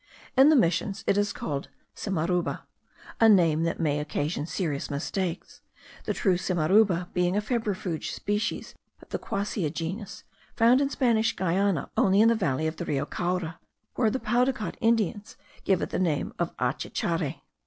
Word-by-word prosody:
In 270 +3 +7
the 310 - +6
Missions 180 - +1
it - - +2
is 205 0 +1
called 140 -2 -4 0.3
simaruba; 180 -2 -1 0.6
a 225 - +7
name 165 -6 +4
that 165 - -2
may 150 -3 +1
occasion 150 +1 -2
serious 155 -7 -2
mistakes, 170 +4 -4 0.4
the - - 0
true 185 -4 +2
simaruba 180 +1 +2
being 180 +2 +1
a - - +4
febrifuge 210 -7 -2
species 210 +1 -2 0.3
of - - -19
the - - -3
Quassia 200 -4 -2
genus, 175 +6 -5 0.3
found 240 +3 +5
in 275 - +1
Spanish 235 -5 +1
Guiana 185 -2 0
only 195 0 +3
in 225 +2 +6
the - - +5
valley 160 - 0
of 160 0 -3
Rio 140 -2 -1
Caura, 175 -2 -3 0.3
where 225 -3 +2
the 260 - -2
Paudacot 240 0 0
Indians 220 -3 0 0.3
give 190 -3 +2
it - - -4
the - - -1
name 160 -6 0
of 175 -1 -2
achecchari. 150 +5 -2
185 Hz, 155 wpm, -27 LUFS, 165-215 Hz, 0.6 s, In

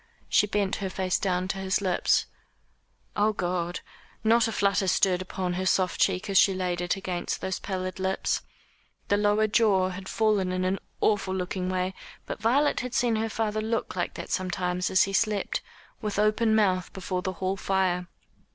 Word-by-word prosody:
She 210 - +4
bent 200 -1 0
her 195 - -3
face 185 -1 -1
down 185 -1 0
to 195 - -2
his 190 +1 0
lips. 185 -3 +2 0.9
Oh 210 +1 +2
God! 175 -2 -2 0.4
not 230 +1 +4
a - - -2
flutter 200 -2 +1
stirred 185 0 +3
upon 185 -1 -3
her 185 +1 -2
soft 185 -1 +1
cheek 185 +4 +2
as 195 -2 +4
she 195 - +4
laid 180 -1 -1
it 175 0 0
against 185 -2 -3
those 190 - -3
pallid 185 -1 -4
lips. 190 0 0 0.7
The 205 - +4
lower 210 +1 +3
jaw 205 -4 +3
had 190 +1 -7
fallen 210 -4 +1
in 185 0 -1
an 190 +1 0 0.2
awful 195 -3 +1
looking 185 0 -2
way; 185 0 -1 0.3
but - - -6
Violet 270 +7 +3
had 250 -1 -4
seen 235 -3 +2
her 225 +1 -1
father 215 -1 -1
look 225 -1 -2
like 175 - -2
that - - -7
sometimes 180 -1 -1
as 185 - +5
he 195 - -3
slept, 210 -1 0 0.4
with 210 -3 -3
open 215 +1 +3
mouth, 185 -4 +2
before 185 -1 -3
the 185 0 -3
hall 185 +2 -2
fire. 190 -2 0
190 Hz, 180 wpm, -27 LUFS, 185-210 Hz, 0.9 s, as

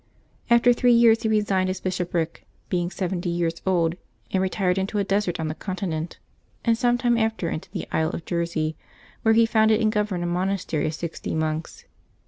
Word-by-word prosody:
After 235 +1 +6
three 245 0 +3
years 230 -1 +5
he 220 - 0
resigned 200 -3 +2
his 185 - -3
bishopric, 175 -3 -2 0.2
being 175 -2 0
seventy 180 -1 -3
years 170 -1 -1
old, 170 -2 +2 0.3
and 190 - +1
retired 190 -1 0
into 195 +2 -2
a 200 - +2
desert 195 -3 0
on 160 - -1
the 155 - -2
continent, 175 -3 -4 0.5
and 230 -1 +4
some 245 +1 +2
time 240 -1 +2
after 220 -6 0
into 155 - -5
the - - -5
isle 160 0 +1
of 170 - -6
Jersey, 170 -2 -1 0.5
where 220 0 +4
he 230 0 +6
founded 220 -1 +3
and 215 -1 +2
governed 210 -5 -1
a - - -1
monastery 180 -3 -1
of 155 - -3
sixty 165 0 -5
monks. 160 0 -3
185 Hz, 185 wpm, -24 LUFS, 170-220 Hz, 0.5 s, After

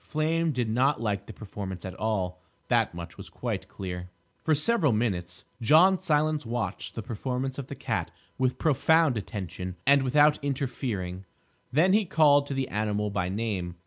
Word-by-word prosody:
Flame 160 +2 0
did 125 -4 -1
not 130 +5 +2
like 100 -3 -2
the - - -7
performance 95 -4 -7
at 95 - -5
all: 95 -5 -2 0.3
that - - +2
much 85 -1 -8
was - - -9
quite - - -4
clear. 90 -2 -6 0.3
For 155 - +3
several 155 - +2
minutes 90 -6 -2 0.2
John 170 - +5
Silence 155 0 +1
watched 115 -5 -4
the 115 - -4
performance 130 +3 -3
of 135 - -6
the - - -7
cat - - -2 0.3
with 130 -1 +1
profound 160 -1 +3
attention 95 -4 -5
and 140 +1 +6
without 145 +3 +4
interfering. 120 -9 -3 0.5
Then 170 +8 +4
he 210 0 +4
called 145 -5 +4
to 140 - -3
the 135 -1 -1
animal 105 0 -1
by 90 -3 -1
name. 95 -4 -3
120 Hz, 165 wpm, -27 LUFS, 100-145 Hz, 0.5 s, and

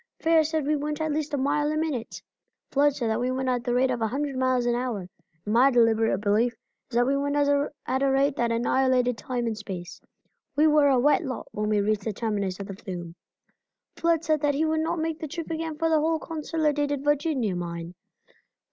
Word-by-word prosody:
Fair 325 -1 +4
said 310 -1 -1
we 300 +1 +2
went 295 +1 -3
at 315 -1 -1
least 305 +1 -2
a 290 - 0
mile 295 +2 +1
a 310 - -1
minute. 305 -7 -3 0.5
Flood 285 0 +3
said 235 -5 -1
that 220 - 0
we 250 +1 0
went 260 0 -1
at 245 -1 0
the 245 -1 -1
rate 255 +1 +3
of 245 -2 -2
a 225 - +2
hundred 275 +3 -3
miles 255 -1 +1
an 240 - +2
hour, 240 -7 -3 0.4
and 210 - -1
my 250 +4 +6
deliberate 225 -4 +3
belief 215 +4 +2 0.4
is 235 - -8
that 245 +1 +4
we 275 +2 +1
went 285 +1 -1
at 285 -2 0
a 275 - +3
rate 275 +1 +2
that 235 -3 0
annihilated 250 +1 +2
time 245 +1 -3
and 225 -1 -1
space. 185 -4 -7 0.5
We 300 - +4
were 300 -2 +5
a 270 -2 +4
wet 295 +7 +3
lot 260 -4 -5
when 210 0 -2
we 210 -1 +2
reached 210 0 0
the 220 - -1
terminus 200 -4 -2
of 200 - -5
the 195 - -7
flume. 175 -4 -7 0.8
Flood 335 -1 +1
said 310 -3 +1
that 290 -1 +1
he 310 +3 +1
would 315 0 +1
not 325 +2 -1
make 320 0 -2
the 315 - -4
trip 335 +2 -6
again 320 -1 -3
for 325 - +1
the 320 -1 +3
whole 320 +1 +1
Consolidated 300 -3 -1
Virginia 290 - +1
mine. 170 -1 -5
265 Hz, 220 wpm, -26 LUFS, 230-300 Hz, 0.8 s, my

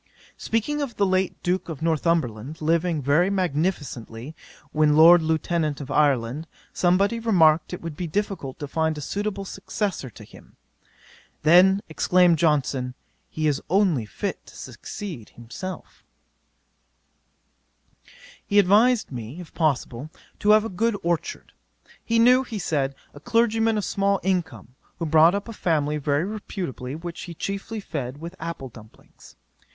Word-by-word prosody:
'Speaking 295 +7 -1
of 270 -5 -4
the 200 - +2
late 185 -1 0
Duke 180 0 -1
of 160 -1 -6
Northumberland 155 -5 0
living 165 -1 0
very 150 +7 +3
magnificently 150 - -2 0.4
when 150 -1 +3
Lord 170 +2 +8
Lieutenant 160 -1 -1
of 140 -1 -7
Ireland, 145 0 +1 0.3
somebody 195 +6 +2
remarked 165 -9 +3
it 180 - -6
would 165 -3 -5
be 175 +2 -4
difficult 185 -6 -3
to 145 - -6
find 160 +1 -1
a - - -4
suitable 200 +5 -3
successor 195 - -4
to - - -13
him: - - -17 0.9
then 185 +5 +6
exclaimed 175 +1 +3
Johnson, 135 -5 +1 0.3
he 155 - -3
is 145 -3 +1
only 175 - +2
fit - - -4
to - - -15
succeed 170 - -8
himself. 125 +11 -8 2.4
'He 205 - 0
advised 210 +4 +4
me, 120 +5 -7
if 175 - -11
possible, 145 -3 -1 0.3
to 205 - 0
have 215 +1 +6
a - - -3
good 220 +3 0
orchard. 170 -1 -3 0.5
He 230 - 0
knew, 250 +3 +6
he 235 -4 -6
said, 140 -7 -1 0.2
a - - -11
clergyman 225 -2 +2
of 210 - -1
small 200 0 +1
income, 170 - -2 0.2
who 165 - -3
brought 160 +3 +5
up 200 +2 -4
a 230 - -7
family 150 -6 0
very 145 +2 0
reputably 180 - -5
which 170 +1 -7
he 170 -2 -9
chiefly 200 +5 -4
fed 140 -9 -5
with 170 +3 -8
apple 165 -5 -6
dumplings. 110 -2 -17
170 Hz, 145 wpm, -24 LUFS, 145-195 Hz, 2.4 s, Lord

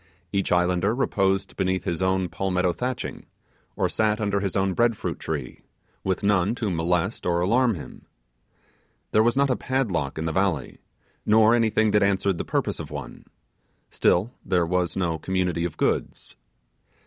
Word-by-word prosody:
Each 100 -1 0
islander 90 +4 +2
reposed 95 -7 0
beneath 95 -2 0
his 85 +1 -2
own 95 0 +1
palmetto 90 -1 0
thatching, 125 +5 -4 0.5
or - - +1
sat 105 0 0
under 100 -2 0
his 100 -1 -2
own 95 -1 +1
bread 115 +1 +2
fruit - - -4
trees, - - -5 0.4
with 95 0 -1
none 100 +1 +2
to 110 -5 -2
molest 90 +4 0
or 85 -1 +1
alarm 115 +5 +2
him. 80 - -11 1.0
There 110 - +4
was 120 +3 +2
not 140 -1 +3
a - - +2
padlock 100 - -1
in 80 - -3
the 80 - -1
valley, 80 -7 -1 0.4
nor 110 +1 +5
anything 110 -2 +2
that 105 - +3
answered 100 -2 +1
the - - -1
purpose - - -2
of - - -6
one: - - -8 0.7
still 100 +8 +2
there 90 -2 +1
was 90 +1 -1
no 85 -4 -1
community 90 -1 -1
of 85 - -5
goods. - - -2
95 Hz, 160 wpm, -25 LUFS, 90-110 Hz, 1.0 s, nor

